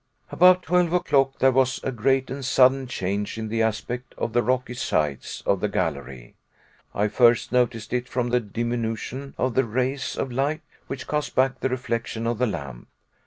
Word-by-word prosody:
About 180 +1 +5
twelve 180 -1 +2
o'clock 135 -6 +2
there 135 - +4
was 130 0 +2
a 135 - -1
great 130 +2 +1
and 135 +1 -5
sudden 130 0 +4
change 100 -2 -3
in 110 -1 -4
the 115 +1 0
aspect 115 +3 -2
of 115 - -3
the 120 - +3
rocky 125 0 -1
sides 75 - -2
of 100 - +2
the 105 - -1
gallery. 70 -9 -3 0.6
I 105 +1 +2
first 120 +1 +3
noticed 120 -3 0
it 125 0 -1
from 120 -1 -1
the 125 +1 +3
diminution 120 +4 -4
of 130 -1 0
the 130 - +3
rays 130 +3 -2
of 130 - -2
light 140 +6 -1 0.3
which 135 -1 -6
cast 150 0 -2
back 130 0 +2
the 130 - 0
reflection 115 -2 -3
of 115 -1 -1
the 125 - +2
lamp. 70 - -6
125 Hz, 180 wpm, -24 LUFS, 110-135 Hz, 0.6 s, About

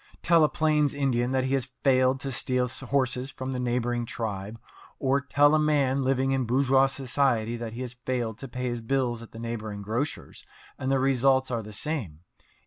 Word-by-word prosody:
Tell 165 -2 +5
a 150 - +4
plains 150 -2 +1
Indian 125 -4 +1
that 130 -1 +1
he 130 +1 -1
has 135 -1 0
failed 130 -1 +3
to 135 - -3
steal 125 0 0
horses 130 0 -1
from 130 0 -5
the 130 - -3
neighbouring 120 -1 -1
tribe, 105 -1 -4 0.4
or 135 +1 +1
tell 145 +1 +4
a 155 - +4
man 140 -3 +2
living 135 0 +1
in 135 -2 +1
bourgeois 135 +2 +3
society 130 -4 0
that 115 -1 -6
he 120 - -6
has 125 -1 -5
failed 125 -3 -3
to 135 - -7
pay 125 +1 -6
his 120 -1 -3
bills 120 -1 -1
at 115 - -12
the - - -11
neighbouring 110 -3 -5
grocer's, 120 +9 -4 0.4
and 130 +1 -1
the 135 - +3
results 130 0 +2
are 115 -2 -1
the 105 0 -10
same. 105 - -4
130 Hz, 195 wpm, -27 LUFS, 120-135 Hz, 0.4 s, Tell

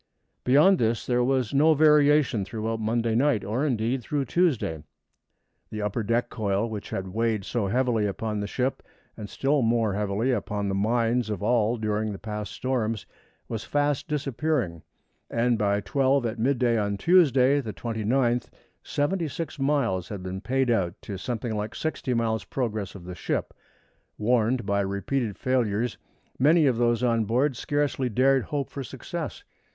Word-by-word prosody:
Beyond 150 +9 +5
this 115 -1 0
there 125 -1 +2
was 130 -1 0
no 155 +3 +5
variation 150 -5 +4
throughout 110 +3 -3
Monday 115 +1 0
night, 120 -3 +2
or 115 +7 -1
indeed 125 -2 0
through 140 +4 -2
Tuesday. 125 - 0 0.9
The 105 -1 -4
upper 105 +3 -1
deck 115 +3 0
coil, 100 0 0
which 105 -3 -6
had 95 0 -4
weighed 110 0 -1
so 115 -5 -1
heavily 115 -1 +1
upon 105 +1 -3
the 105 - -3
ship 130 +4 -2 0.3
and 105 -1 -8
still 140 +1 +1
more 115 -3 +2
heavily 105 +5 0
upon 105 -3 -2
the - - -1
minds 115 +3 +1
of 105 -2 -3
all 115 +1 +2
during 110 0 -1
the 100 - -6
past 105 0 -5
storms 115 -5 -2 0.4
was 115 -2 -4
fast 145 -1 0
disappearing, 140 - -1 0.5
and 120 +1 +1
by 100 -2 +1
twelve 135 +4 +1
at 115 0 -3
midday 120 -2 +2
on 100 -1 -1
Tuesday, 140 - +4
the 110 -5 -5
29th, 120 +5 0 0.3
seventy 165 +4 -1
six 155 +1 -6
miles 135 -11 0
had 100 -3 -6
been 95 +1 -5
paid 130 +1 +1
out 95 -4 0
to 100 - -6
something 115 +2 -3
like 105 +1 -4
sixty 145 -5 -2
miles' 110 -1 0
progress 110 -7 -3
of 90 -3 -10
the 90 - -6
ship. - - -3 0.6
Warned 120 +1 +1
by 100 0 +1
repeated 100 +3 -2
failures, 120 -3 0 0.4
many 155 +4 +5
of 130 -4 +2
those 120 0 +2
on 115 -2 +2
board 125 +6 +1
scarcely 145 -1 -1
dared 130 +3 +3
hope 145 -2 -3
for 140 - -5
success. - - -6
115 Hz, 160 wpm, -26 LUFS, 105-135 Hz, 0.9 s, Beyond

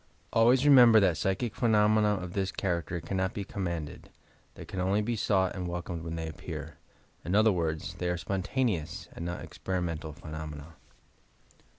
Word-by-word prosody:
Always 125 +4 +5
remember 125 -6 +8
that 95 -5 +3
psychic 95 +6 -1
phenomena 105 -2 +3
of 90 -2 -6
this 95 -1 -1
character 85 -3 -2
can 95 - -4
not 95 0 -1
be 100 - -3
commanded. 85 -6 -5 0.5
They - - -9
can 95 - -6
only 95 +3 +1
be 120 +2 -1
sought 95 -3 +1
and 90 -2 -4
wel 85 0 -3
comed 85 -1 -5
when 85 0 -4
they 80 -1 -4
appear. 80 0 -7 0.5
In 90 +5 -1
other 110 +1 +5
words, 85 -2 -2
they 90 +1 -3
are 90 - 0
"spontaneous" 95 - -2
and - - -7
not 85 0 -4
"experimental" 85 -4 -4
phenomena. 75 0 -8
90 Hz, 170 wpm, -29 LUFS, 85-105 Hz, 0.5 s, remember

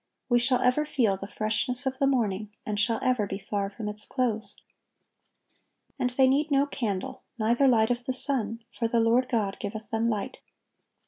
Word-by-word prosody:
We 240 -1 +4
shall 250 +1 +2
ever 255 +4 +3
feel 245 -9 +1
the 195 +1 -7
freshness 235 +6 -1
of 260 0 -2
the 275 - +3
morning, 215 -6 0 0.2
and 210 -1 -2
shall 225 +1 +2
ever 250 -5 +1
be 195 - -4
far 200 0 -3
from 210 +1 -7
its 210 0 0
close. 235 -4 0 1.4
"And 250 - +1
they 260 +1 +3
need 290 +4 +2
no 280 -1 +3
candle, 215 -9 -3 0.2
neither 235 +5 +3
light 225 -2 +4
of 240 0 -2
the 260 - -1
sun; 230 -4 -1
for 230 0 -2
the 230 +1 +1
Lord 235 +3 +3
God 210 -5 0
giveth 215 +2 -6
them 225 +1 +1
light." 210 -3 -3
230 Hz, 185 wpm, -27 LUFS, 210-255 Hz, 1.4 s, We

